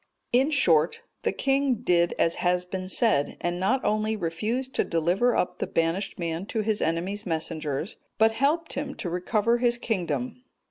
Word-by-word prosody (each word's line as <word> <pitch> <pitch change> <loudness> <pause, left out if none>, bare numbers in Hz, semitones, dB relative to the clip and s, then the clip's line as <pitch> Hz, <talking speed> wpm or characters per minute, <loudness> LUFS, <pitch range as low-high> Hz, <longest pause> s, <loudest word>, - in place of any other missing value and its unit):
In 260 +4 +4
short, 170 - +3 0.2
the - - 0
king 270 -1 +1
did 175 -5 +2
as 165 - +1
has 180 0 +1
been 185 0 -5
said, 190 -11 +2
and 175 0 -2
not 245 +8 +1
only 215 +1 +1
refused 215 +9 -2
to - - +1
deliver 175 +9 +1
up - - -1
the - - -2
banished 165 +4 -1
man 170 +2 -3
to 220 - -1
his 215 0 0
enemy's 185 +6 -2
messengers, 160 -1 -3 0.2
but 220 +1 +5
helped 295 +8 0
him 280 0 -4
to 175 - -5
recover 215 +6 +1
his 240 -1 +2
kingdom. 235 +3 -2
200 Hz, 170 wpm, -26 LUFS, 170-240 Hz, 0.2 s, but